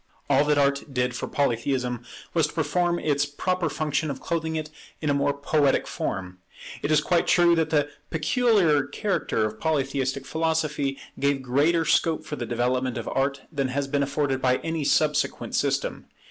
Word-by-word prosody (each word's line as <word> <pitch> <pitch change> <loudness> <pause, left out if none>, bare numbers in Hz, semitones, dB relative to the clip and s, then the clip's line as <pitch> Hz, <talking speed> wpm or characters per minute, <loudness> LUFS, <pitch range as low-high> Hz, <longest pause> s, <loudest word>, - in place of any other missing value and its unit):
All 140 +1 +5
that 150 0 +2
Art 140 +1 +1
did 125 -1 0
for - - -4
Polytheism 125 -2 -1 0.3
was 160 -3 +3
to - - -11
perform 170 +2 +1
its 145 -3 0
proper 175 +4 -1
function 155 +1 -1
of 135 -2 -4
clothing 160 -1 -2
it 155 -1 -4 0.3
in 150 -2 0
a - - +3
more 140 0 +2
poetic 140 0 +1
form. 90 -1 -4 0.4
It - - -2
is 155 -1 +4
quite 170 +1 +1
true 175 -1 +5
that 160 -1 +1
the 145 -2 +2 0.2
peculiar 165 - +3
character 165 - -1
of 110 0 -5
Polytheistic 135 -3 -1
philosophy 155 -4 -1 0.2
gave 140 -1 +1
greater 150 +6 +2
scope 155 0 +2
for 150 - -4
the 120 -4 -5
development 125 +1 0
of 115 - -5
Art 135 +1 0
than 140 -4 -1
has 135 +2 -2
been 140 +1 0
afforded 140 -1 0
by 125 -1 +3
any 160 -2 -2
subsequent 150 +1 +1
system. - - -1
145 Hz, 175 wpm, -25 LUFS, 135-160 Hz, 0.4 s, All